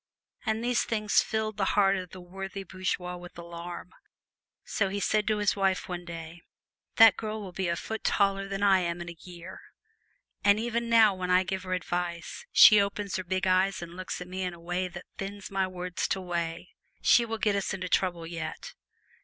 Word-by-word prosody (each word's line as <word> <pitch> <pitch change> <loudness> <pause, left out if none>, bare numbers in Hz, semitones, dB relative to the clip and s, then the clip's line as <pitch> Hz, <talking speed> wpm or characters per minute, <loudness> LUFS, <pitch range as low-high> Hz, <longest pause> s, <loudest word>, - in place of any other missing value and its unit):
And 220 +1 0
these 245 0 +2
things 215 -3 +2
filled 220 -1 -2
the 195 -2 0
heart 195 -1 +5
of 185 -2 -5
the 185 - -10
worthy 195 +2 -7
bourgeois 185 -1 -3
with 175 0 -12
alarm; 170 +1 -8 0.7
so 200 -2 0
he 200 +1 -3
said 210 +1 +1
to 215 -1 +2
his 205 -1 +1
wife 195 -2 0
one 175 -1 -5
day: 165 0 -8 0.5
"That 225 -2 +8
girl 215 0 -4
will 195 -3 -7
be 185 +1 -2
a 170 - 0
foot 220 +5 -5
taller 195 -1 +1
than 195 0 -3
I 195 -2 +5
am 170 -1 -2
in 170 - -6
a 170 - -14
year, 180 0 -10 0.8
and 205 +1 +5
even 235 0 -2
now 225 -3 +6
when 185 -1 -4
I 180 +1 +5
give 190 0 -3
her 185 - -2
advice, 175 - -3
she 210 -2 +9
opens 200 0 -2
her 185 - -3
big 185 +1 -1
eyes 185 0 +2
and 170 0 -9
looks 185 0 -5
at 180 - -7
me 185 +1 -5
in 180 -2 -3
a - - -15
way 175 +2 -2
that 175 0 -9
thins 195 0 -6
my 195 -1 +1
words 180 -1 -3
to 195 - -1
whey. 170 -1 -3 0.3
She 240 - +6
will 225 -1 -3
get 210 -2 +1
us 200 - -1
into 185 -1 -3
trouble 175 -2 0
yet! 165 -1 -6
185 Hz, 205 wpm, -28 LUFS, 175-200 Hz, 0.8 s, she